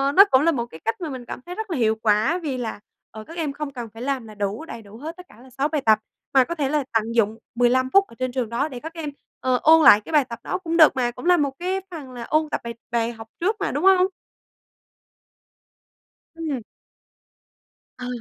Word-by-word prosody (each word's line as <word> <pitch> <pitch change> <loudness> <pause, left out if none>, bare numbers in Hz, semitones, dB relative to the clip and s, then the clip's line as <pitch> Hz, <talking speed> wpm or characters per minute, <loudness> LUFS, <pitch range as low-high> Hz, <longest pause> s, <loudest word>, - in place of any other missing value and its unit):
nó 395 - +10
cũng 260 - +6
là 335 +3 +4
một 240 -6 -2
cái 160 -9 -13
cách 225 - -1
mà 330 - -3
mình 255 -3 -7
cảm - - -6
thấy 360 - -7
rất 440 0 -5
là 325 - -1
hiệu 220 -3 +2
quả 220 +9 +2
vì 275 -4 -2
là, 230 -4 -4 0.3
ờ, 215 0 -9
các 330 +10 -11
em 310 -4 -2
không 285 -1 -5
cần 240 -3 -6
phải 225 - -10
làm 260 -3 -2
là 215 - -11
đủ 205 +7 -3
đầy 235 -8 -8
đủ 210 +1 -13
hết 320 +7 -7
tất 360 - -11
cả 215 - -17
là 260 - -15
6 270 +3 -1
bài 305 -2 -1
tập 220 -3 +4 0.3
mà 265 -1 +6
có 340 +6 -5
thể 285 -4 -1
là 300 0 +1
tận 225 +1 0
dụng 220 -1 +2 0.2
15 250 +2 +3
phút 395 0 +6
ở 230 - -16
trên 255 0 -1
trường 245 -3 -2
đó 245 +6 0
để 260 -5 -7
các 320 +5 -8
em, 325 -3 -5 0.3
ờ, 255 -1 +1
ôn 320 +1 +7
lại 210 -6 +8
cái 215 - -10
bài 300 -4 +4
tập 235 -2 -8
đó - - -2
cũng 335 -1 -1
được 315 -4 +7
mà. 245 -2 0
Cũng 240 - -10
là 355 0 +5
một 285 -3 +1
cái 375 +2 -1
phần 295 -7 -8
là 245 -2 -7
ôn 310 +5 +1
tập - - -2
bài 235 0 -5 0.2
bài 230 0 0
học 225 -1 -11
trước 395 +6 +1
mà, 400 - -1
đúng 290 - -2
hông? 375 -1 +6 2.3
Ừm. 310 -6 -3 1.4
Ờ. 250 - -5
260 Hz, 250 wpm, -23 LUFS, 235-320 Hz, 2.3 s, nó